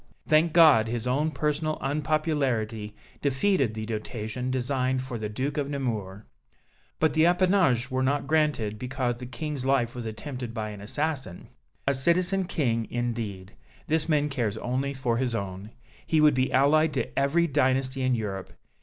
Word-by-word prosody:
Thank 155 Hz, +2 st, +4 dB
God, 155 Hz, -9 st, +6 dB
his 120 Hz, 0 st, -3 dB
own 140 Hz, +5 st, +1 dB
personal 155 Hz, +1 st, -1 dB
unpopularity 135 Hz, -8 st, -1 dB, 0.3 s
defeated 140 Hz, -, +1 dB
the 110 Hz, 0 st, -4 dB
dotation 110 Hz, +2 st, -4 dB
designed 130 Hz, 0 st, 0 dB
for 125 Hz, -3 st, -5 dB
the 105 Hz, -1 st, -3 dB
Duke 135 Hz, +7 st, -3 dB
of 140 Hz, -1 st, -2 dB
Nemours. 110 Hz, -8 st, -3 dB, 0.8 s
But 155 Hz, -2 st, +2 dB
the 160 Hz, +2 st, +4 dB
appanages 175 Hz, -9 st, +3 dB
were 130 Hz, 0 st, 0 dB, 0.2 s
granted 135 Hz, -8 st, 0 dB
because 125 Hz, -1 st, -2 dB
the 125 Hz, 0 st, -8 dB
King's 135 Hz, +2 st, -4 dB
life 130 Hz, -3 st, +1 dB
was 120 Hz, -2 st, -5 dB
attempted 125 Hz, +1 st, -6 dB
by 110 Hz, -1 st, -3 dB
an 105 Hz, -1 st, -9 dB
assassin. 135 Hz, -, -3 dB, 0.4 s
A 140 Hz, -, +2 dB
Citizen 180 Hz, +7 st, +2 dB
King, 120 Hz, -10 st, -1 dB
indeed! 115 Hz, -6 st, -4 dB, 0.3 s
This 160 Hz, +1 st, 0 dB
man 150 Hz, -2 st, +3 dB
cares 115 Hz, -6 st, -2 dB
only 130 Hz, +4 st, -2 dB
for 125 Hz, -3 st, 0 dB
his 125 Hz, -2 st, -1 dB
own. 100 Hz, 0 st, -5 dB, 0.4 s
He 160 Hz, -, +3 dB
would 150 Hz, -1 st, +6 dB
be 130 Hz, 0 st, +1 dB
allied 150 Hz, +4 st, +4 dB
to 120 Hz, -, -2 dB
every 145 Hz, +5 st, +3 dB
dynasty 135 Hz, -2 st, +1 dB
in 130 Hz, -1 st, +2 dB
Europe. 100 Hz, -4 st, -4 dB
130 Hz, 155 wpm, -27 LUFS, 115-150 Hz, 0.8 s, God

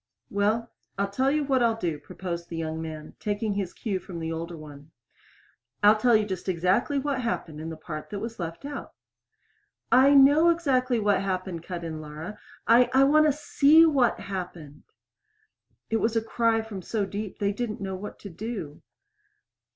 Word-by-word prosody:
"Well, 215 Hz, +3 st, 0 dB, 0.3 s
I'll 200 Hz, 0 st, -1 dB
tell 260 Hz, +6 st, +1 dB
you 300 Hz, +1 st, +1 dB
what 265 Hz, -2 st, +1 dB
I'll 230 Hz, -2 st, +3 dB
do," 165 Hz, -7 st, -2 dB
proposed 175 Hz, -1 st, -6 dB
the 165 Hz, -, -5 dB
young 160 Hz, 0 st, -3 dB
man, 155 Hz, -1 st, -7 dB
taking 210 Hz, 0 st, -1 dB
his 195 Hz, -3 st, -2 dB
cue 200 Hz, -5 st, -3 dB
from 180 Hz, -1 st, -9 dB
the 165 Hz, 0 st, -4 dB
older 165 Hz, +1 st, -5 dB
one. 145 Hz, -1 st, -12 dB, 0.9 s
"I'll 210 Hz, +1 st, +8 dB
tell 235 Hz, +2 st, +3 dB
you 215 Hz, -1 st, +3 dB
just 190 Hz, -2 st, -4 dB
exactly 185 Hz, -, +1 dB
what 275 Hz, -1 st, -1 dB
happened 165 Hz, -10 st, -3 dB
in 160 Hz, -, -5 dB
the 160 Hz, -, -7 dB
part 155 Hz, -1 st, -7 dB
that 205 Hz, -, -5 dB
was 225 Hz, +2 st, -6 dB
left 170 Hz, +7 st, -5 dB
out." 285 Hz, 0 st, -7 dB, 1.0 s
"I 265 Hz, +4 st, +6 dB
know 290 Hz, +5 st, +7 dB
exactly 260 Hz, -7 st, +1 dB
what 205 Hz, -2 st, +2 dB
happened," 185 Hz, -3 st, -3 dB
cut 175 Hz, 0 st, -6 dB
in 160 Hz, -2 st, -5 dB
Laura. 155 Hz, +6 st, -8 dB, 0.3 s
"I 240 Hz, +2 st, +6 dB
I 270 Hz, -, +7 dB
want 305 Hz, +2 st, +5 dB
to -, -, +4 dB
see 300 Hz, +2 st, +5 dB
what 270 Hz, -7 st, +2 dB
happened." 175 Hz, -6 st, -7 dB, 1.1 s
It 225 Hz, -, +3 dB
was 225 Hz, +1 st, 0 dB
a 225 Hz, -, +3 dB
cry 225 Hz, 0 st, +1 dB
from 210 Hz, -4 st, -7 dB
so 205 Hz, +2 st, -2 dB
deep 200 Hz, +1 st, -6 dB
that 205 Hz, -, -2 dB
they 200 Hz, -, +1 dB
didn't 220 Hz, 0 st, -4 dB
know 195 Hz, -1 st, -4 dB
what 195 Hz, +3 st, -7 dB
to 200 Hz, -, -8 dB
do. 190 Hz, -6 st, -6 dB
205 Hz, 185 wpm, -26 LUFS, 170-240 Hz, 1.1 s, I'll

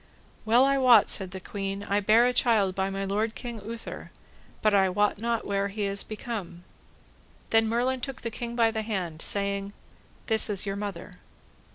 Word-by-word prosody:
Well 235 Hz, +4 st, +5 dB
I 275 Hz, 0 st, +2 dB
wot, 245 Hz, -5 st, +6 dB
said 190 Hz, -2 st, -2 dB
the 190 Hz, +1 st, -7 dB
queen, 195 Hz, +1 st, -5 dB
I 205 Hz, 0 st, +1 dB
bare 215 Hz, +4 st, +5 dB
a 250 Hz, -, +2 dB
child 215 Hz, -7 st, +3 dB
by 190 Hz, +1 st, -1 dB
my 195 Hz, 0 st, -3 dB
lord 215 Hz, +3 st, -1 dB
King 235 Hz, -3 st, -6 dB
Uther, 230 Hz, +2 st, -7 dB, 0.5 s
but 215 Hz, -1 st, +4 dB
I 195 Hz, -1 st, +4 dB
wot 205 Hz, +2 st, +1 dB
not 230 Hz, 0 st, -1 dB
where 200 Hz, 0 st, 0 dB
he 205 Hz, +1 st, -4 dB
is 200 Hz, 0 st, -1 dB
become. 210 Hz, -5 st, -6 dB, 0.9 s
Then 225 Hz, 0 st, +4 dB
Merlin 250 Hz, +3 st, 0 dB
took 270 Hz, 0 st, -6 dB
the 230 Hz, -, -3 dB
king 235 Hz, +1 st, -5 dB
by 230 Hz, -1 st, +3 dB
the 220 Hz, -1 st, -2 dB
hand, 185 Hz, -7 st, -3 dB
saying, 200 Hz, 0 st, -2 dB, 0.5 s
This 220 Hz, -1 st, +2 dB
is 200 Hz, -1 st, +1 dB
your 195 Hz, -1 st, -2 dB
mother. 200 Hz, -2 st, -6 dB
210 Hz, 185 wpm, -27 LUFS, 195-230 Hz, 0.9 s, wot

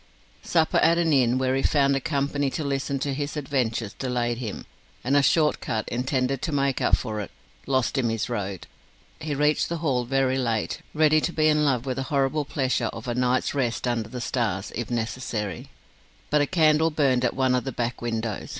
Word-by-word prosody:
Supper 160 Hz, -2 st, +1 dB
at 165 Hz, +1 st, +4 dB
an 165 Hz, -2 st, +2 dB
inn, 125 Hz, -2 st, +3 dB
where 130 Hz, 0 st, +1 dB
he 135 Hz, -, +1 dB
found 140 Hz, -1 st, +3 dB
a -, -, +1 dB
company 145 Hz, -2 st, 0 dB
to 155 Hz, -, -3 dB
listen 140 Hz, 0 st, -1 dB
to 140 Hz, -1 st, -1 dB
his 145 Hz, +2 st, -3 dB
adventures, 120 Hz, -7 st, -1 dB
delayed 120 Hz, -2 st, -2 dB
him, 110 Hz, -5 st, -5 dB, 0.4 s
and 130 Hz, +4 st, +1 dB
a 145 Hz, -, +6 dB
short 150 Hz, +3 st, +2 dB
cut, 110 Hz, -2 st, -2 dB
intended 130 Hz, +1 st, -1 dB
to -, -, -2 dB
make 140 Hz, -2 st, 0 dB
up -, -, +4 dB
for 110 Hz, -4 st, -4 dB
it, 100 Hz, -, -5 dB, 0.4 s
lost 130 Hz, 0 st, +1 dB
him 120 Hz, -3 st, +1 dB
his 115 Hz, -1 st, -1 dB
road. 100 Hz, -6 st, -4 dB, 0.5 s
He 150 Hz, -2 st, -3 dB
reached 150 Hz, +2 st, +2 dB
the 170 Hz, -, -2 dB
Hall 135 Hz, -7 st, 0 dB
very 135 Hz, +1 st, +1 dB
late, 115 Hz, -4 st, -1 dB
ready 155 Hz, 0 st, +4 dB
to 175 Hz, -, -1 dB
be 155 Hz, -2 st, +2 dB
in 150 Hz, 0 st, +3 dB
love 130 Hz, -4 st, +1 dB
with 130 Hz, -1 st, -3 dB
the -, -, -1 dB
horrible 140 Hz, +1 st, +1 dB
pleasure 130 Hz, -3 st, 0 dB
of 115 Hz, +2 st, -7 dB
a 120 Hz, -, -1 dB
night's 125 Hz, +1 st, +1 dB
rest 125 Hz, -3 st, -1 dB
under 115 Hz, -2 st, -1 dB
the 125 Hz, +1 st, -6 dB
stars, 110 Hz, -6 st, -2 dB
if 120 Hz, 0 st, -4 dB
necessary. 115 Hz, -5 st, -3 dB, 0.6 s
But 150 Hz, 0 st, +4 dB
a 145 Hz, -, +1 dB
candle 160 Hz, -2 st, +3 dB
burned 135 Hz, -5 st, +2 dB
at 125 Hz, -, +1 dB
one 130 Hz, -1 st, +2 dB
of 125 Hz, -, +1 dB
the 135 Hz, -, -4 dB
back 120 Hz, 0 st, -3 dB
windows. 115 Hz, -3 st, -3 dB
130 Hz, 205 wpm, -25 LUFS, 120-145 Hz, 0.6 s, a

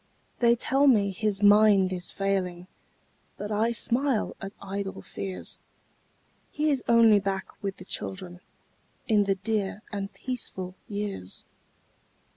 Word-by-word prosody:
They 235 Hz, -1 st, +5 dB
tell 270 Hz, +4 st, +2 dB
me 205 Hz, -6 st, +4 dB
his 205 Hz, +1 st, 0 dB
mind 205 Hz, -2 st, +6 dB
is 180 Hz, -1 st, -2 dB
failing, 185 Hz, -3 st, -2 dB, 0.7 s
But 205 Hz, +1 st, -5 dB
I 220 Hz, +3 st, +2 dB
smile 240 Hz, +1 st, 0 dB
at 195 Hz, -, -5 dB
idle 195 Hz, 0 st, -5 dB
fears; 190 Hz, -1 st, -5 dB, 0.9 s
He 300 Hz, 0 st, 0 dB
is 270 Hz, -3 st, 0 dB
only 230 Hz, -3 st, +6 dB
back 195 Hz, -1 st, -3 dB
with 195 Hz, -1 st, -3 dB
the 185 Hz, -, -11 dB
children, 180 Hz, -2 st, -4 dB, 0.7 s
In 210 Hz, -3 st, +4 dB
the 195 Hz, -1 st, +1 dB
dear 205 Hz, +1 st, -2 dB
and 200 Hz, -1 st, -4 dB
peaceful 190 Hz, -8 st, -5 dB
years. 200 Hz, -, -5 dB
200 Hz, 125 wpm, -27 LUFS, 190-225 Hz, 0.9 s, mind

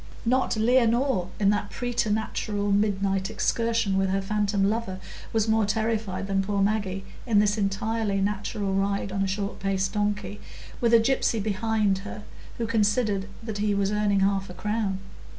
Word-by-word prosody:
Not 255 Hz, -1 st, +2 dB
Leonore, 235 Hz, -2 st, +3 dB
in 200 Hz, -1 st, +4 dB
that 205 Hz, 0 st, -1 dB
preternatural 215 Hz, -3 st, -1 dB
midnight 195 Hz, -1 st, +1 dB
excursion 230 Hz, -4 st, +1 dB
with 195 Hz, 0 st, +1 dB
her 195 Hz, +1 st, +1 dB
phantom 200 Hz, 0 st, 0 dB
lover, 210 Hz, -3 st, -2 dB, 0.3 s
was 220 Hz, -1 st, +1 dB
more 220 Hz, 0 st, +3 dB
terrified 215 Hz, -3 st, -1 dB
than 195 Hz, 0 st, +1 dB
poor 200 Hz, +1 st, -1 dB
Maggie 195 Hz, -1 st, 0 dB, 0.2 s
in 220 Hz, -3 st, +3 dB
this 205 Hz, 0 st, +4 dB
entirely 210 Hz, 0 st, -1 dB
natural 200 Hz, 0 st, -1 dB
ride 200 Hz, 0 st, 0 dB
on 195 Hz, +1 st, -1 dB
a 195 Hz, -, +1 dB
short 200 Hz, +1 st, -3 dB
paced 195 Hz, 0 st, -1 dB
donkey, 205 Hz, -1 st, -2 dB, 0.4 s
with 235 Hz, -1 st, +4 dB
a -, -, +8 dB
gypsy 230 Hz, -1 st, +1 dB
behind 210 Hz, -1 st, +1 dB
her, 210 Hz, +1 st, -8 dB, 0.3 s
who 235 Hz, -, -1 dB
considered 210 Hz, -2 st, +1 dB, 0.2 s
that 220 Hz, -2 st, -4 dB
he 205 Hz, -1 st, +1 dB
was 200 Hz, 0 st, +1 dB
earning 210 Hz, -2 st, +2 dB
half 195 Hz, -1 st, +1 dB
a 180 Hz, -, -9 dB
crown. 210 Hz, 0 st, -1 dB
205 Hz, 160 wpm, -26 LUFS, 195-220 Hz, 0.4 s, a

